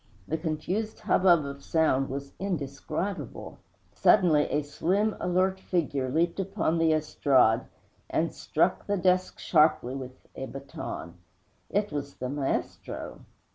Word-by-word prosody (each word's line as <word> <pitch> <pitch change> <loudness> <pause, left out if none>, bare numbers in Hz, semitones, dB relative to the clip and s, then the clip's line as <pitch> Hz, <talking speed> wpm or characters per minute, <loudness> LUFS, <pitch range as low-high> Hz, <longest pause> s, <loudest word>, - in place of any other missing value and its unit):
The - - -1
confused 180 +8 -3
hubbub 180 -7 +4
of 140 0 -7
sound 145 -5 +2
was 140 +1 -5
indescribable. 170 +1 -4 0.3
Suddenly 165 -7 +4
a 150 - 0
slim, 195 +9 0
alert 185 +1 +1
figure 145 -8 -1
leaped 170 +7 +1
upon 195 -4 0
the 165 -1 +4
estrade 140 -7 +3 0.4
and - - 0
struck - - 0
the 205 - +1
desk 185 0 +2
sharply 155 -6 +3
with 130 -1 -8
a 135 - -5
baton. 135 -11 -7 0.5
It 205 +1 0
was 145 -1 -4
the 125 - -4
maestro! 135 - -3
155 Hz, 125 wpm, -28 LUFS, 140-185 Hz, 0.5 s, hubbub